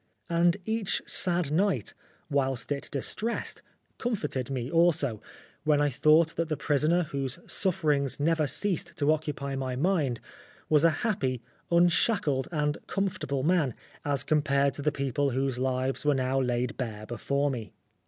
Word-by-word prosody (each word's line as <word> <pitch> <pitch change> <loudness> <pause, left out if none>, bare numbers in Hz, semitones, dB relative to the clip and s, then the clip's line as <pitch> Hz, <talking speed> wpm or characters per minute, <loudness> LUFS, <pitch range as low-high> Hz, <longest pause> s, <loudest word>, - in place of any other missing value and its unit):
And 170 +2 +3
each 220 -3 -1
sad 170 -5 +1
sight, 195 +3 +1 0.3
whilst 135 -5 0
it 140 -1 -3
distressed, 215 - -2 0.4
comforted 150 - -2
me 130 -1 -3
also, 160 -9 +2 0.4
when 150 -1 +3
I 145 -1 +2
thought 155 +4 +4
that 165 -1 -1
the 155 - -1
prisoner, 155 +5 +2
whose 140 -4 -3
sufferings 150 -8 +1
never 155 0 +2
ceased 195 +2 -2
to 145 +1 +3
occupy 145 -3 -3
my 130 -1 -2
mind, 145 -5 +1 0.5
was 150 -1 +4
a 165 - +7 0.2
happy, 130 - -1 0.3
unshackled, 170 - +3
and 150 -1 0
comfort 195 -1 -2
able 135 -1 -1
man, 155 -7 +2 0.3
as 140 -3 0
compared 140 -2 +2
to - - -5
the 150 +1 +1
people 140 0 0
whose 135 -1 -1
lives 130 0 -1
were 145 -1 +3
now 130 +1 +1
laid 125 -1 -1
bare 110 -4 -4
before 140 +5 -1
me. 115 -6 -5
145 Hz, 150 wpm, -28 LUFS, 135-165 Hz, 0.5 s, a